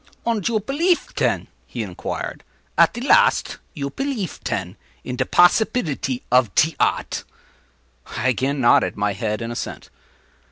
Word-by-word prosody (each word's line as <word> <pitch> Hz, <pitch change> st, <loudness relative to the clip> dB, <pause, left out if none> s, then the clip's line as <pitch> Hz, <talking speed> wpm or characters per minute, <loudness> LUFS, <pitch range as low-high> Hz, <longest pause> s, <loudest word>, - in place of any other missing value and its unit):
“Und 230 Hz, -4 st, 0 dB
you 230 Hz, -2 st, +1 dB
pelief, 320 Hz, -, 0 dB
ten,” -, -, 0 dB, 0.2 s
he -, -, -4 dB
inquired, -, -, -5 dB, 0.3 s
“at -, -, +4 dB
te 240 Hz, -, -5 dB
last? 475 Hz, -, +3 dB, 0.2 s
You 140 Hz, -3 st, -4 dB
pelief, 265 Hz, -, -4 dB
ten, 95 Hz, -1 st, -3 dB, 0.3 s
in 125 Hz, -, -4 dB
te 130 Hz, 0 st, 0 dB
possibilty 175 Hz, -, +2 dB
of 125 Hz, -5 st, +3 dB
te 160 Hz, 0 st, +3 dB
odd?” -, -, 0 dB, 0.9 s
I 130 Hz, -, -1 dB
again 135 Hz, +4 st, 0 dB
nodded 120 Hz, -3 st, +3 dB
my 105 Hz, 0 st, 0 dB
head 105 Hz, +2 st, -3 dB
in 115 Hz, -, -4 dB
assent. 120 Hz, -, -6 dB
140 Hz, 145 wpm, -22 LUFS, -, 0.9 s, at